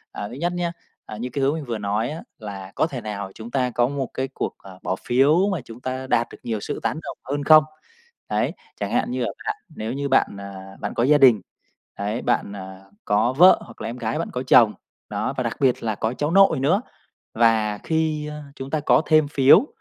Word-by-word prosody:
À, 100 - -5
thứ 120 - -9
nhất 170 +6 -1
nhá, 175 -1 -2 0.3
à, 105 - -7
như 120 +4 -4
cái 140 - -2
hướng 140 +3 +2
mình 160 -2 -4
vừa 115 -4 -3
nói 105 +4 -1
á, 160 +3 -6 0.2
là 100 -3 -8
có - - +2
thể 135 -6 -5
nào 100 -3 -5
chúng 115 +1 -9
ta 125 -1 0
có 120 0 +2
một 135 -2 -3
cái 130 +1 -2
cuộc, - - -3
à, 95 - -13
bỏ 95 - -1
phiếu 150 +10 +4
mà 180 - -2
chúng 115 0 -11
ta 130 +1 -4
đạt 120 -2 +2
được - - -12
nhiều 110 -3 -3
sự - - -4
tán - - -1
đồng - - -7
hơn 145 0 -1
không? 155 0 +8 0.7
Đấy, - - 0 0.3
chẳng - - -2
hạn - - +1
như - - -2
là - - -1 0.2
bạn 425 - -1 0.2
nếu 110 +2 -3
như 140 +1 -2
bạn, 135 - +4
à, 95 -1 -9
bạn - - -4
có - - 0
gia 145 +4 +5
đình, 125 -7 +6 0.6
đấy, 105 +4 -2
bạn, 100 - 0
à, 95 -1 -9 0.2
có 105 +4 +2
vợ 180 +8 +7
hoặc 115 - -15
là - - -4
em 115 - -5
gái 115 -2 -2
bạn - - -3
có 125 - -2
chồng, 120 -4 +5 0.3
đó, - - -2
và - - 0
đặc - - -3
biệt 130 -3 +2
là 110 -2 -1
có 110 +3 -2
cháu 145 +3 -1
nội 190 -5 +5
nữa, 170 - +2 0.5
và 110 -2 +3
khi, 160 0 -1
a, 150 0 -7
chúng 135 +1 -7
ta 155 - 0
có 150 - +4
thêm 155 -2 +4
phiếu 145 - +6
125 Hz, 240 wpm, -23 LUFS, 110-150 Hz, 0.7 s, không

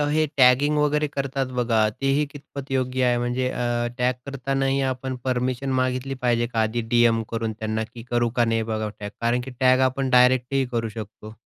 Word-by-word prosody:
हे 155 - +3
टॅगिंग 135 +4 +5
वगैरे 150 0 +2
करतात 135 -1 -2
बघा, 120 -2 +1 0.2
तेही 135 +2 +2
कितपत 140 -1 -9
योग्य 130 -1 0
आहे? 120 -1 +2
म्हणजे 125 +1 -1
अं, 120 -1 -1
टॅग 125 0 +2
करतानाही 135 0 -1
आपण 130 0 -4
परमिशन 130 +1 -1
मागितली 130 +1 -1
पाहिजे 120 -1 +2
का? 115 -2 -1
आधी 110 +2 0
डीएम 115 -1 +4
करून 115 -1 -2
त्यांना, 110 0 -2
की 115 -1 -9
करू 120 -1 +2
का 120 - +4
नाही 115 0 0
बघा 110 0 -2
टॅग? 105 0 -5
कारण 120 +1 +1
की 130 +2 -8
टॅग 130 0 +4
आपण 135 0 -3
डायरेक्ट 125 +1 +4
ही 135 -1 +2
करू 115 -1 -1
शकतो. 110 0 -9
125 Hz, 190 wpm, -24 LUFS, 120-135 Hz, 0.2 s, टॅगिंग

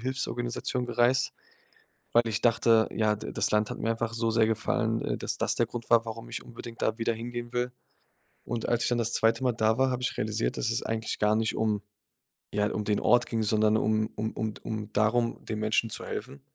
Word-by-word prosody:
Hilfsorganisation 125 0 -2
gereist, 120 +2 +2 0.8
weil 120 - +6
ich 110 -2 -1
dachte, 115 -1 +4
ja, 110 -1 +2
da 105 - -7
das - - 0
Land 105 0 +2
hat - - -5
mir 115 - -1
einfach 115 0 -1
so 115 0 0
sehr 110 0 +4
gefallen, 110 0 0
äh, - - -1
dass - - -3
das - - +1
der - - +1
Grund 120 -2 -7
war, 115 -1 +5
warum 115 0 -7
ich - - -5
unbedingt 115 -1 -9
da 110 - +1
wieder 115 0 +1
hingehen 120 +1 -6
will. 125 0 0 0.7
Und 115 -2 -3
als 120 0 +2
ich - - +2
dann 120 -1 +1
das 115 0 0
zweite 115 +3 +2
Mal 125 - +3
da 110 -1 +2
war, 130 0 +3
habe 125 0 -2
ich 125 - -1
realisiert, 110 +1 -1
dass 115 - 0
es 115 - -1
eigentlich 110 0 -2
gar 105 0 +3
nicht 110 0 0
um 105 -2 0 0.7
ja, 105 0 +1
um 105 - -2
den 105 0 +1
Ort 120 +2 +4
ging, 115 -1 -1
sondern 110 0 +3
um 110 0 +1
um 110 +1 -2
um 110 -1 -3
d - - -13
um 110 -1 -4
darum, 115 +3 +1
den 110 - -4
Menschen 110 +1 +1
zu - - -4
helfen. 130 +6 -6
115 Hz, 225 wpm, -28 LUFS, 110-120 Hz, 0.8 s, weil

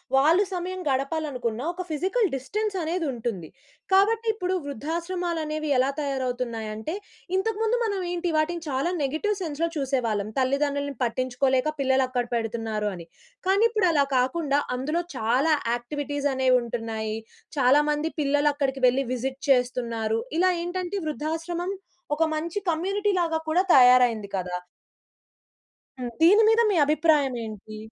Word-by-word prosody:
వాళ్ళు 320 +9 +5
సమయం 365 +1 -4
గడపాలనుకున్నా 270 -4 -2
ఒక 365 - -5
ఫిజికల్ 380 - +1
డిస్టెన్స్ 415 +10 -3
అనేదుంటుంది. 245 - -3 0.5
కాబట్టి 445 +4 +3
ఇప్పుడు 370 -3 -2
వృద్ధాశ్రమాలనేవి 320 +1 -3
ఎలా 260 +2 +3
తయారవుతున్నాయంటే 250 -2 -3 0.4
ఇంతకు 420 +2 -1
ముందు 460 +2 +2
మనమేంటి 355 -4 -2
వాటిని 335 +2 0
చాలా 275 +6 0
నెగెటివ్ 315 +10 0
సెన్స్‌లో 330 0 -1
చూసేవాళ్ళం. 235 -7 -1
తల్లిదండ్రులని 280 +1 0
పట్టించుకోలేక 255 +3 +1
పిల్లలక్కడ 260 -2 +1
పెడుతున్నారు 225 -2 -2
అని. 170 -2 -9 0.4
కానీ 395 +3 +4
ఇప్పుడలా 345 -10 +3
కాకుండా 280 +2 +1 0.2
అందులో 305 +7 -1 0.2
చాలా 255 +8 +2 0.2
యాక్టివిటీస్ 285 +3 -2
అనేవుంటున్నాయి. 230 -4 0 0.4
చాలా 270 +3 +5
మంది 300 +2 -1
పిల్లలు 290 +1 +2
అక్కడికి 270 -2 -1
వెళ్లి 265 +2 +2
విజిట్ 265 +2 -4
చేస్తున్నారు. 235 -3 +1 0.2
ఇలా 370 +1 +4
ఏంటంటే 365 +2 -3
వృద్ధాశ్రమం 330 +5 -3 0.4
ఒక 325 - +2
మంచి 335 +6 -2
కమ్యూనిటీలాగా 360 -1 0
కూడా 325 +3 +3
తయారయింది 245 -5 +6
కదా! 180 -1 -3 1.4
హ్మ్. 245 -1 -3
దీని 400 +7 +7
మీద 450 +1 +5
మీ - - +1
అభిప్రాయమేంటి? 260 - 0
285 Hz, 115 wpm, -25 LUFS, 250-345 Hz, 1.4 s, దీని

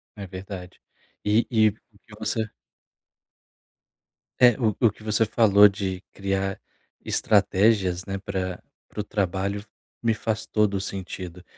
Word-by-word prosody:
É 100 -2 -7
verdade, 95 -1 -8 0.4
e 105 +3 +3
e 110 -4 +4
o 105 0 -16
que 105 - -14
você 110 0 -1 1.9
é, 125 -1 +7
o 110 -5 +1
o 115 - +5
que 105 - -17
você 110 +1 +2
falou 105 -2 +6
de 95 -2 -3
criar 95 0 -2 0.5
estratégias, 95 -3 +2
né, 95 0 -3
pra 95 -2 -4 0.2
para 105 - -5
o - - -5
trabalho 100 0 -2 0.4
me 115 -1 +2
faz 110 0 -2
todo 105 -2 +2
o 95 - -1
sentido 90 -2 -6
100 Hz, 135 wpm, -25 LUFS, 95-110 Hz, 1.9 s, é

